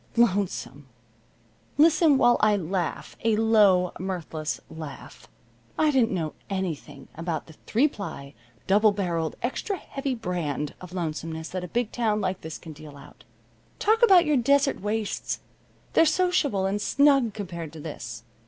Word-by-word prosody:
Lonesome! 190 - 0 0.9
Listen 310 -1 +5
while 240 -2 +5
I 215 -1 +4
laugh 180 -1 -3
a 225 -1 +3
low 210 -5 +4
mirthless 165 -4 -4
laugh. 160 -2 -10 0.5
I 310 -1 +3
didn't 255 -5 +3
know 160 -5 -2 0.2
anything 160 -7 -4
about 165 -1 -4
the 160 - -14
three 250 +7 +3
ply, 170 - -7 0.3
double 210 +2 +4
barreled, 170 -5 -2
extra 370 - -2
heavy 275 -4 -4
brand 170 - -3
of 180 -1 -10
lonesomeness 160 -2 -4
that 185 -1 -4
a - - -5
big 235 +5 -1
town 220 -3 0
like 190 -2 -2
this 160 0 -6
can 160 -2 -10
deal 150 -1 -12
out. - - -16 0.5
Talk 445 +2 +2
about 380 -7 +7
your 300 -2 +3
desert 275 +1 +2
wastes! 210 +1 -2 0.5
They're 325 - +5
sociable 300 - +1
and 200 +2 -1
snug 275 -4 +3
compared 170 -6 -6
to 160 - -9
this. 120 -7 -7
195 Hz, 145 wpm, -26 LUFS, 160-240 Hz, 0.9 s, about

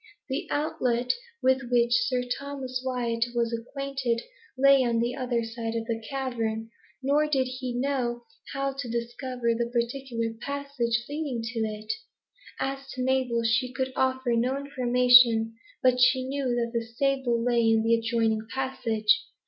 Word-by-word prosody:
The 265 - -2
outlet 250 -5 0 0.3
with 260 -1 +2
which 240 -1 +3 0.2
Sir 250 -1 0
Thomas 260 0 -4
Wyat 240 -3 0
was 235 -1 +1
acquainted 255 0 -2 0.3
lay 275 0 +6
on 235 -2 +1
the 240 +1 0
other 250 -3 -1
side 225 0 -4
of 225 -1 -2
the 225 -1 -3
cavern; 230 -5 -2 0.3
nor 290 +3 +3
did 275 -3 +2
he 255 -1 -4
know 245 -2 -1 0.3
how 275 0 -1
to 270 -3 -5
discover 235 +1 -2
the 235 +1 -1
particular 235 -1 -2
passage 280 -5 -2
leading 285 -6 -3
to 230 +1 -4
it. 215 -1 -2 0.7
As 275 0 -3
to 255 - -3
Mabel, 255 -3 +1
she 245 +3 +1
could 260 0 -2
offer 260 -1 +1
no 245 +3 +1
information, 250 -4 +5 0.3
but 250 -1 +4
she 255 0 +4
knew 275 0 -2
that 240 -1 0
the 230 -1 0
stable 245 +1 0
lay 240 0 +2
in 225 0 +4
an 225 - 0
adjoining 225 -1 +1
passage. 230 -5 +1
245 Hz, 150 wpm, -27 LUFS, 230-265 Hz, 0.7 s, lay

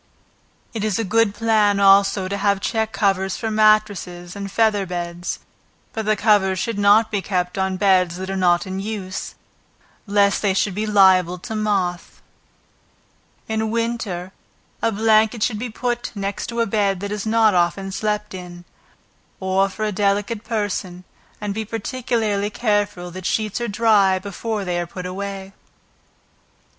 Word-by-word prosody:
It 220 -3 -3
is 215 -3 0
a 225 - 0
good 220 0 +2
plan 210 -2 +2
also 195 -1 +4
to 200 - -3
have 200 -1 +1
check 220 +1 -1
covers 195 -2 0
for 225 - -3
matresses 210 -5 +1
and 200 -1 -6
feather 210 -3 +2
beds, 175 0 -4 0.6
but 220 -1 -4
the 215 - +3
covers 205 -3 +3
should 205 +3 -2
not 210 +2 +5
be 205 -2 0
kept 180 -2 -2
on 190 -1 -1
beds 185 -3 +3
that 190 +1 -5
are - - -2
not 180 0 +2
in 190 0 -4
use, 200 -2 -5 0.7
lest 200 0 +3
they 195 -3 +1
should 195 0 +1
be 215 +3 -2
liable 190 -3 +4
to 220 +5 -7
moth. 195 -5 -1 1.3
In 220 0 -1
winter 225 -6 -2 0.5
a 230 - +1
blanket 220 +1 +3
should 215 -4 0
be 245 +2 -4
put 240 +2 -3
next 200 +3 -4
a 235 0 0
bed 200 -3 0
that 200 0 -4
is 210 0 -3
not 220 -1 +4
often 185 +2 0
slept 210 +1 -2
in, 175 -1 -9 0.7
or 190 +1 +1
for 215 +3 -4
a 210 - -1
delicate 205 +3 0
person, 200 -5 -3 0.4
and 205 -1 -3
be 220 +2 -3
particularly 220 -2 -2
careful, 205 -5 -1
that 185 +1 -5
sheets 215 +1 -1
are 240 - -1
dry 205 -3 +3
before 200 +2 -4
they 175 -1 -1
are 175 - -3
put 180 +1 -8
away. 195 +1 -6
200 Hz, 155 wpm, -21 LUFS, 190-215 Hz, 1.3 s, not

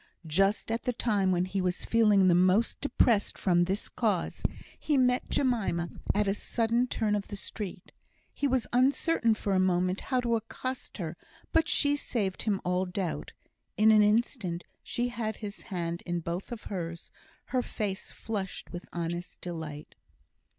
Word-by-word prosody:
Just 195 +8 +2
at 230 - 0
the 250 - -1
time 205 -5 +1
when 180 0 +2
he 190 +1 -2
was 180 0 -1
feeling 210 -4 +5
the 180 - +6
most 185 +6 +3
depressed 235 -6 +2
from 175 -2 +3
this 195 +3 -2
cause, - - -1 0.4
he 300 -2 +1
met 250 -1 +2
Jemima 210 -10 +1 0.3
at 205 0 +2
a 195 - +3
sudden 235 +3 +1
turn 220 -4 0
of 205 -1 -1
the 205 - -5
street. 200 -1 -6 0.4
He 285 - 0
was 260 -3 +1
uncertain 255 -1 +3
for 200 -2 -1
a 190 - +3
moment 185 0 +2
how 255 -2 0
to 235 -1 +1
accost 255 +3 -5
her, 170 -3 -4 0.4
but 325 -1 +4
she 290 -1 +4
saved 205 -9 -2
him 205 -3 0
all 180 +1 +1
doubt; 180 -1 -3 0.4
in 220 +1 +6
an 215 -1 +7
instant 210 -4 +1 0.2
she 245 0 -2
had 225 -3 -3
his 210 -1 -7
hand 170 -4 -3
in 175 0 0
both 170 +7 -4
of 235 -2 -6
hers, 170 -3 -5 0.4
her 255 - +3
face 205 -5 -4
flushed 200 -4 -5
with 175 +1 -7
honest 175 +1 -4
delight. 160 -4 -6
205 Hz, 165 wpm, -29 LUFS, 180-235 Hz, 0.4 s, an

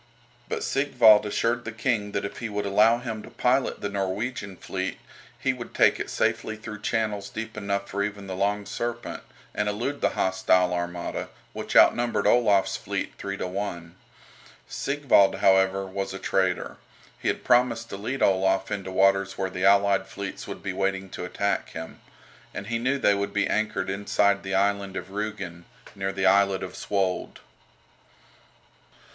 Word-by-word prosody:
But - - -2
Sigvald 125 -5 +5
assured 115 +3 0
the 110 - -5
King 110 -3 -1
that - - -1
if 100 - -6
he 115 - -4
would 105 0 -3
allow 105 +4 +4
him 115 -3 -5
to - - -11
pilot 130 +2 +1
the - - -1
Norwegian 100 +1 -3
fleet 95 0 -4 0.4
he - - 0
would - - -9
take - - +4
it - - -4
safely 110 - -1
through 105 -1 -8
channels 105 -2 -1
deep 110 0 -6
enough 100 -1 -2
for 100 - -3
even 100 -1 -3
the 95 -1 -5
"Long 100 +2 0
Serpent," 120 +2 -4 0.3
and 105 0 0
elude 120 +8 -3
the - - 0
hostile 95 -1 +2
armada, 85 0 -3 0.2
which - - -5
outnumbered 120 0 +5
Olaf's 105 -5 +4
fleet - - -4
three 100 0 -4
to - - -3
one. 90 -3 -5 0.7
Sigvald, 135 -9 +3
however, 95 0 +3
was 95 0 -4
a - - -3
traitor. 95 -2 0 0.4
He - - -4
had - - -1
promised 120 -2 +3
to - - -4
lead 125 +7 -2
Olaf 95 0 +2
into 100 -2 -3
waters 95 0 +2
where 95 -1 -2
the 95 0 -1
allied 100 0 +4
fleets 100 -1 -6
would - - -7
be 95 - -3
waiting 95 0 -1
to - - -5
attack 100 +2 -1
him. 80 0 -8 0.5
And - - -5
he 115 +2 -2
knew 130 +4 +1
they 105 -6 +4
would 100 0 -2
be 105 - +3
anchored 110 0 -1
inside 100 0 +1
the 95 0 -3
island 100 -1 +1
of 95 - -6
Rügen, 100 -4 -5 0.3
near 95 0 -2
the 95 0 -2
islet 100 0 +4
of - - -6
Svold. 95 -2 -1
100 Hz, 170 wpm, -26 LUFS, 95-110 Hz, 0.7 s, Sigvald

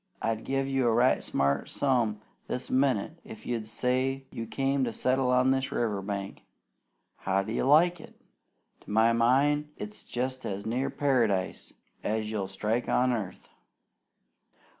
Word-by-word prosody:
I'd 115 0 -2
give 135 0 0
a 135 -1 0
right 120 +3 +3
smart 70 0 0
sum 120 -6 +1 0.3
this 125 - -4
minnit 135 +3 +1
if 110 - -11
you'd 115 -3 -3
say 130 +3 0
you 115 0 -5
came 135 +4 0
to 120 - 0
settle 130 +1 +1
on 125 +1 +4
this 135 0 0
river 105 -4 -1
bank. 100 0 -5 0.8
How 95 +1 0
do 110 - -5
you - - 0
like 165 +4 +4
it? - - -15 0.6
To - - -16
my 110 +2 +4
mind 140 +6 +3
it's 210 0 -6
jest 130 +1 -3
as 100 0 -4
near 125 +5 -1
Paradise 125 -9 0 0.3
as 110 0 -1
you'll 100 -3 -2
strike 105 +5 -2
on 125 0 +3
earth. 105 -6 -5
125 Hz, 150 wpm, -28 LUFS, 110-135 Hz, 0.8 s, on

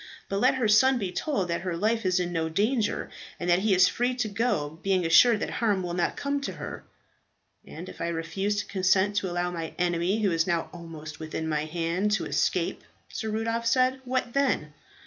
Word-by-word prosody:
But 195 - -1
let 255 +5 +4
her 250 -4 +1
son 260 +5 +5
be 195 -6 -3
told 195 - -1
that 170 - -1
her 180 -3 -3
life 220 +2 +1
is 185 0 +2
in 175 -1 -2
no 160 -1 -1
danger, 215 +6 0 0.3
and 175 - -3
that 175 - +4
he 200 0 +2
is 180 0 +6
free 245 +1 0
to 245 -3 -1
go, 200 -8 -1
being 190 -2 +1
assured 215 +7 +6
that - - -2
harm 205 -5 0
will 175 -1 -3
not 175 0 0
come 280 0 -1
to 275 - -4
her." - - -7 0.8
"And - - -8
if - - -10
I - - -1
refuse 170 +5 -2
to - - -10
consent 190 +1 +2
to 190 - 0
allow 175 0 -1
my 165 -2 -5
enemy, 180 +4 0
who 195 - +3
is 165 +1 +1
now 170 -2 -1
almost 160 -3 -9
within 160 0 -4
my 150 -1 -1
hand, 170 +5 -1
to 215 - 0
escape," - - 0 0.3
Sir 220 - -4
Rudolph 230 +2 -1
said, 255 +2 +2
"what 250 -1 -2
then?" 260 - 0
190 Hz, 210 wpm, -27 LUFS, 170-225 Hz, 0.8 s, is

